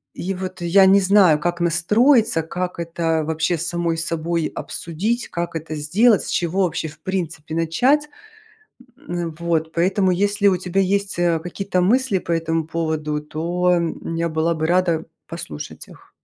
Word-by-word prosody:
И 190 +2 -3
вот 185 0 -6
я 185 +3 +5
не 195 +1 +6
знаю, 185 -5 +5
как 175 +1 -2
настроиться, 210 - +3
как 180 +2 -4
это 165 -1 -1
вообще 160 +2 0
с 165 - -4
самой 170 -1 -1
собой 165 0 -1
обсудить, 210 +9 -3
как 170 0 -4
это 160 0 -5
сделать, 195 +10 +3
с - - -7
чего 180 +3 0
вообще 165 -2 -1
в 150 - -12
принципе 160 -5 -4
начать. 250 - +2 0.9
М, 170 -2 -5
вот 165 -2 -1
поэтому, 185 +3 +2
если 200 +3 +1
у 185 - +3
тебя 180 +2 -1
есть, 195 0 0
э, 170 -2 +2
какие-то 185 +2 -2
мысли 240 +2 +2
по 170 - -4
этому 165 -1 -1
поводу, 155 -2 -2
то 175 +4 0 0.4
я 170 0 0
была 160 +1 0
бы 160 0 -1
рада 170 -2 +1 0.2
послушать 80 - -8
их. - - -17
170 Hz, 160 wpm, -21 LUFS, 165-190 Hz, 0.9 s, не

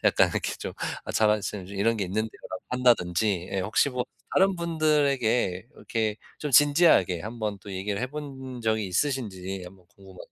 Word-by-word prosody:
약간 - - +5
이렇게 - - -2
좀 - - -5 0.3
"아 - - -5
자만심 105 -3 +1
좀 100 +2 -9
이런 115 +3 +2
게 100 - -1
있는데요."라고 100 -1 -4
한다든지 105 -7 +2
예. 95 - 0
혹시 105 +8 +2
뭐 125 -1 -2 0.3
다른 190 +1 +4
분들에게 140 - +1
이렇게 110 -2 -2 0.2
좀 150 - -3
진지하게 145 - +4
한번 110 -1 -4
또 100 - -9
얘기를 100 +2 -3
해 125 - 0
본 135 -3 -7
적이 110 -2 0
있으신지 95 -5 -2
한번 90 0 -14
궁금하 95 -2 -15
110 Hz, 355 characters per minute, -27 LUFS, 95-130 Hz, 0.3 s, 약간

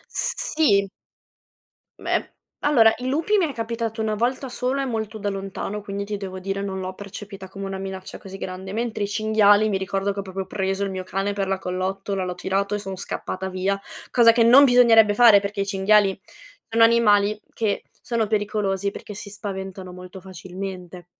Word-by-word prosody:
S - - +2 0.2
sì. 200 -11 +3 1.1
Beh, - - -1 0.3
allora 230 -7 +5
i 250 +1 -5
lupi 320 +10 +1
mi 350 -5 +2
è - - -6
capitato 230 -1 -3
1 215 -1 0
volta 255 +4 -1
sola 255 +2 -1
e - - -1
molto 220 -3 -3
da 205 -1 -2
lontano, 195 +1 -5
quindi 200 0 -5
ti 205 0 -4
devo 190 -1 -6
dire 195 +1 -3
non 190 -1 -4
l'ho 185 0 -5
percepita 200 -1 -9
come 195 +1 -8
una 195 0 -4
minaccia 190 -1 -7
così 195 0 -10
grande, 190 +1 -6
mentre 220 -2 -2
i - - -1
cinghiali 215 0 +3
mi 195 - +1
ricordo 195 +1 -1
che 200 - -5
ho - - 0
proprio 190 0 -5
preso 195 +1 -2
il 195 - -1
mio 185 0 -4
cane 195 +2 -2
per 200 -1 -2
la 195 0 0
collottola, 190 +1 -3
l'ho 180 -1 -4
tirato 200 +3 -1
e - - -2
sono 195 -2 -6
scappata 190 0 -5
via, 190 +1 -1 0.3
cosa 230 -2 +6
che 230 -1 +4
non 260 +5 +8
bisognerebbe 230 -4 +6
fare 220 -2 +7
perché 200 0 -3
i - - 0
cinghiali 195 0 +3 0.5
sono 230 0 +3
animali 210 -2 +4
che 215 -3 -1 0.2
sono 230 -3 -1
pericolosi 205 -2 -1
perché 210 - -9
si 205 0 -8
spaventano 190 -2 -6
molto 180 +1 -10
facilmente 185 -1 -8
200 Hz, 190 wpm, -23 LUFS, 190-220 Hz, 1.1 s, non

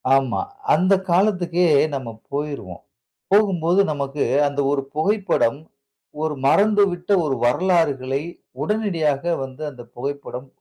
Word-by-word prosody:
ஆமா. 135 -2 +1 0.3
அந்த 185 +2 +3 0.2
காலத்துக்கே 180 -2 +2 0.3
நம்ம 130 -4 -5 0.2
போயிருவோம். 140 - -5 0.5
போகும்போது 190 -3 +3
நமக்கு 140 -1 -2 0.2
அந்த 140 0 -4
ஒரு 140 - +1
புகைப்படம் 160 - +1 0.6
ஒரு 155 -1 -1
மறந்துவிட்ட 200 -1 +2
ஒரு 140 -3 0
வரலாறுகளை 140 -2 +1 0.4
உடனடியாக 170 -10 0 0.2
வந்து 130 +3 -10
அந்த 125 -3 -11
புகைப்படம் 140 0 -5
155 Hz, 100 wpm, -21 LUFS, 135-185 Hz, 0.6 s, அந்த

